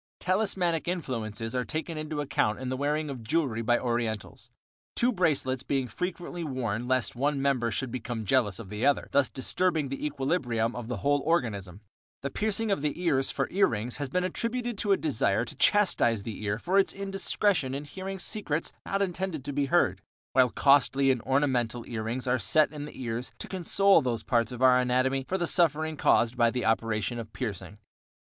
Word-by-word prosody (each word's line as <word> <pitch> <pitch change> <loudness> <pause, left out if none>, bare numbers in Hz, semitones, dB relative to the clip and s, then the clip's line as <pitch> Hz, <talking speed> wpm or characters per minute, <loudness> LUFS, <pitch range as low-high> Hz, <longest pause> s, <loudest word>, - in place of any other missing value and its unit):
Talismanic 185 -4 0
influences 115 - -3
are 125 -1 0
taken 160 +4 -4
into 155 -1 -3
account 110 -6 0
in 130 -1 -4
the 130 - -1
wearing 150 +3 -1
of 130 -3 -7
jewelry 125 -2 0
by 120 +1 +3
Orientals, 115 -3 -3 0.5
two 245 +1 +2
bracelets 145 - +1
being 135 -1 -1
frequently 175 +3 -4
worn 125 -5 -3
lest 130 -2 0
one 140 +3 0
member 135 -4 +1
should 125 +3 -3
become 115 -2 -4
jealous 105 -5 +2
of 110 -5 -9
the 105 +3 -4
other, 140 +1 +2
thus 140 -1 +3
disturbing 155 +2 0
the 135 - -5
equilibrium 135 -6 -1
of 120 -2 -6
the 125 -2 -3
whole 145 0 +3
organism. 105 - -1 0.4
The 140 - -3
piercing 220 0 0
of 195 - 0
the 150 +2 -2
ears 135 -7 +1
for - - -1
ear 195 +1 +4
rings 115 +2 -3
has 145 -2 -4
been 180 +6 0
attributed 235 +6 -2
to 205 - 0
a 195 - +5
desire 120 -6 +1
to 150 - -8
chastise 135 - +3
the 105 -1 -6
ear 105 0 -1
for 185 +11 +2
its 195 - +2
indiscretion 195 -6 0
in 140 - -4
hearing 190 +6 -6
secrets 170 -5 -1
not 195 0 +1
intended 180 -6 -3
to 145 - -4
be 140 0 0
heard, 100 - +2 0.3
while 130 -1 +5
costly 135 0 +4
and 125 -3 -1
ornamental 125 -3 0
ear 115 -2 -4
rings 115 +4 -3
are 130 0 +1
set 150 +10 +3
in 145 -1 -6
the 150 - -11
ears 120 +1 -4
to - - -7
console 190 0 +3
those 120 -4 -2
parts 120 -1 +1
of 125 +1 -4
our 125 -1 +6
anatomy 130 +2 +1
for 190 - -1
the 175 - 0
suffering 155 -2 +2
caused 120 -4 +3
by 120 -2 +4
the 125 +1 -2
operation 115 +1 0
of 110 -1 -8
piercing. 100 -5 -5
135 Hz, 195 wpm, -28 LUFS, 120-165 Hz, 0.5 s, our